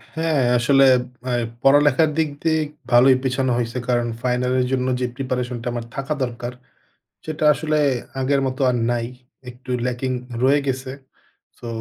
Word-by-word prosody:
হ্যাঁ, 160 -3 +1 0.2
আসলে 135 +3 +4 0.4
অ্যা 125 - -2 0.3
পড়ালেখার 145 +2 +4
দিক 160 -2 +1
দিয়ে 160 -1 +2 0.3
ভালোই 125 +2 +6
পিছানো 130 0 0
হইছে। 120 +1 -2
কারণ 120 -1 +1
ফাইনাল 125 0 0
এর 125 - +1
জন্য 130 -1 0
যে 125 - 0
প্রিপারেশনটা 125 -2 -3
আমার 120 -1 -4
থাকা 135 +2 -2
দরকার, 120 0 -5 0.7
সেটা 155 0 -3
আসলে 155 0 -1 0.4
আগের 135 +1 +1
মতো 130 0 -4
আর 125 - 0
নাই। 120 -1 -1 0.4
একটু 125 +1 -13 0.2
ল্যাকিং 125 +1 -2 0.3
রয়ে 140 +2 +4
গেছে। 130 -1 -3 0.7
সো, - - -10
130 Hz, 145 wpm, -21 LUFS, 125-140 Hz, 0.7 s, ভালোই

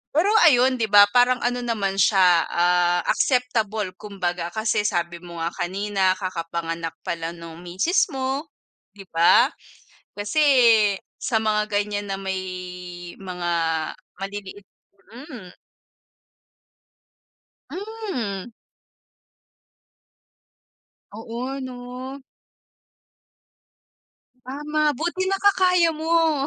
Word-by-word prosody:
pero 340 +6 +3 0.2
ayun, 260 -2 +4
'di 220 - +1
ba, 205 0 +9
parang 250 0 +4
ano 245 0 0
naman 205 -5 -1
siya, 180 -5 +5
ah, 175 0 +2
acceptable 220 -6 0
kumbaga. 175 -4 -4
Kasi 220 -1 0
sabi 175 -1 -2
mo 170 -1 -9
nga 165 - 0
kanina 190 +1 0
kakapanganak 165 -3 -4
pala 165 0 -3
nung 170 0 -10
misis 190 - +1
mo, 265 +2 -2 0.5
'di 195 - -12
ba? 170 +9 +6 0.7
Kasi 205 +10 0 0.8
sa 225 - 0
mga 215 -1 +1
ganyan 205 0 -1
na 195 - -2
may 190 -1 -3 0.8
mga 185 -2 -7 0.8
maliliit 195 0 -7 0.5
mm. 240 - -11 2.2
Hmm. 340 - -5 2.6
Oo 235 +5 -5
'no. 255 +1 -7 2.2
Tama. 295 +3 -1
Buti 345 +5 -2
nakakaya 375 -3 +3
mo. 315 -2 +1
210 Hz, 90 wpm, -23 LUFS, 185-265 Hz, 2.6 s, ba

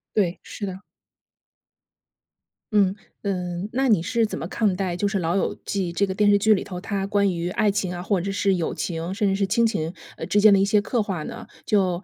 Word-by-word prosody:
对， 185 -4 +1
是 205 - -6
的。 190 -1 -6 1.9
嗯， 200 -2 +3 0.3
呃， 200 - 0 0.4
那 265 +2 +1
你 210 - +5
是 230 -1 +1
怎 - - -5
么 - - -4
看 210 -5 +1
待 185 -2 -2
就 205 +3 0
是 200 0 -1
《老 165 +2 0
友 195 - 0
记》 190 -3 -1
这 200 - +3
个 190 - -3
电 205 +2 +3
视 205 - +6
剧 215 +2 +4
里 190 - 0
头， 180 -2 -6
它 195 0 -3
关 200 -1 +2
于 170 +1 -2
爱 205 +2 +2
情 190 -2 -1
啊， 175 0 -5
或 190 -3 +1
者 195 +2 -3
是 195 -1 +1
友 170 -2 -2
情， 165 +1 -3
甚 210 -2 +1
至 195 - +2
是 195 0 0
亲 230 +4 +3
情， 165 -8 -1 0.3
呃， - - -5
之 205 - +3
间 210 -1 +7
的 195 - +5
一 - - +4
些 210 +1 +3
刻 225 +3 0
画 190 -6 -3
呢？ - - -8 0.2
就 190 -4 +1
195 Hz, 250 characters per minute, -24 LUFS, 180-210 Hz, 1.9 s, 间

